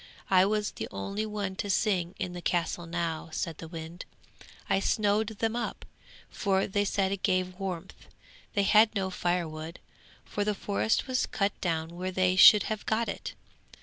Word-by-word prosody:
I 185 0 +6
was 210 0 0
the 110 - -5
only 200 - -3
one 205 -3 -3
to 205 - -3
sing 185 -3 +1
in 180 - -3
the 175 - -6
castle 175 0 -1
now,' 165 -1 -3
said 160 0 -3
the 165 - -7
wind. 165 +1 -8 0.6
'I - - +2
snowed 210 +1 +1
them 225 +1 0
up, 240 - -4 0.4
for 195 -1 0
they 205 +1 0
said 195 -1 +1
it 200 -1 -3
gave 185 -1 0
warmth. 190 -2 -6 0.5
They 200 - +2
had 215 +2 +5
no 190 -1 -1
firewood, 170 -2 -2 0.5
for 205 - -2
the 210 0 0
forest 205 +3 0
was 255 -1 0
cut 200 0 0
down 160 -2 -1
where 185 +1 -3
they 185 0 +2
should 205 +3 +9
have 215 -1 -3
got 220 +1 +1
it. - - -5
190 Hz, 175 wpm, -29 LUFS, 175-205 Hz, 0.6 s, should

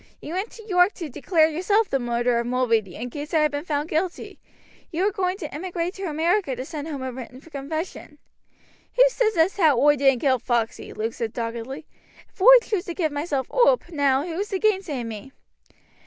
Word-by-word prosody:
You 315 - -7
went 380 +5 -2
to 445 -1 -13
York 360 0 +4
to 330 -5 -6
declare 315 +4 +2
yourself 380 +7 +1
the 270 - 0
murderer 240 0 0
of 235 - -2
Mulready, 230 -7 0
in 245 +1 -6
case 295 +4 -5
I 315 - +4
had 305 -1 +2
been 290 +2 -4
found 295 -2 -1
guilty. 340 +3 -3 0.5
You 345 +4 -1
were 415 - +2
going 375 -2 -1
to 315 -7 -7
emigrate 350 +2 -3
to 390 -1 -6
America 325 -1 0
to 255 +2 -6
send 300 +1 -6
home 285 -4 -5
a 260 - -3
written 255 0 -9
confession." 310 +1 -6 0.8
"Who - - +7
says 440 -5 0
as 330 +5 +3
how 310 -9 +4
oi 295 0 +5
didn't 270 -2 +3
kill 260 -3 +2
Foxey?" 235 -2 -2
Luke 225 +1 -3
said 225 -2 -4
doggedly. 235 +6 -5 0.5
"If - - -15
oi 405 - +4 0.2
choose 405 -4 -2
to 345 - -5
give 320 -5 0
myself 290 -2 -2
oop - - +3
now 285 -2 +2
who 340 0 -4
is 410 - -2
to 390 - -1
gainsay 375 - 0
me?" 230 +4 -8
305 Hz, 205 wpm, -24 LUFS, 260-365 Hz, 0.8 s, Who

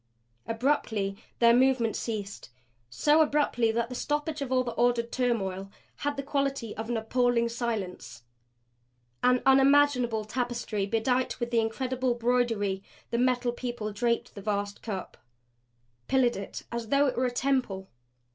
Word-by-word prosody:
Abruptly 225 -5 0 0.2
their 235 0 +6
movement 250 -2 +3
ceased 205 -3 -5 0.4
so 295 - +3
abruptly 290 -7 +2
that 235 +1 0
the - - -6
stoppage 295 +3 -2
of 270 -2 -3
all 255 -1 +3
the 240 - -3
ordered 235 0 +1
turmoil 195 -6 -1 0.3
had 290 0 -2
the 275 - -3
quality 275 -5 -2
of 220 +1 -5
appalling 235 +1 +1
silence. 195 - -4 1.0
An 250 0 +3
unimaginable 270 -4 +4
tapestry 235 -3 -2
bedight 245 +4 0
with 240 0 -3
incredible 250 +2 0
broidery, 230 -5 0 0.3
the 235 - 0
Metal 250 -1 +2
People 240 -3 -4
draped 235 +2 -1
the 200 - -9
vast 200 0 -2
cup. 200 -5 -6 0.9
Pillared 255 -3 +3
it 195 - -6
as 235 -1 -4
though 280 +4 +3
it 265 - 0
were 255 +1 +1
a - - -2
temple. 245 -7 -1
240 Hz, 135 wpm, -28 LUFS, 220-255 Hz, 1.0 s, their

